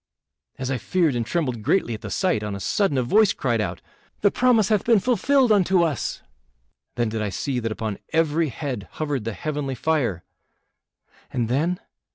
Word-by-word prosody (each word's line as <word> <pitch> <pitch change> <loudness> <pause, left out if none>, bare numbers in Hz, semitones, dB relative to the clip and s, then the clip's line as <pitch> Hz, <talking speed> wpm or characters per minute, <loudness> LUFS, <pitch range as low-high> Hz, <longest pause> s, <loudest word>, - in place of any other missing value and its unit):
As 130 0 -3
I 130 - -1
feared 160 - +1
and 120 - 0
trembled 125 -2 -2
greatly 120 - +1
at 110 - -7
the - - -6
sight, 185 - +1
on 105 -1 -4
a - - -6
sudden 175 - +1
a 130 - +2
voice 205 - +4
cried 120 -5 0
out, 105 - -4 0.4
'The 205 - +4
promise 235 -5 +3
hath 215 -2 +2
been 230 -1 +4
fulfilled 255 +3 +3
unto 190 -3 +4
us!' 155 -8 -2 0.7
Then 120 -2 0
did 110 0 -3
I 105 - -1
see 125 +7 -2
that 115 -2 -3
upon 110 -2 -4
every 160 0 +2
head 130 -6 -5
hovered 145 -7 -2
the 115 - -2
heavenly 145 +4 -3
fire." 125 - 0 1.1
"And 115 -2 -1
then?" 165 +8 0
145 Hz, 185 wpm, -24 LUFS, 115-185 Hz, 1.1 s, voice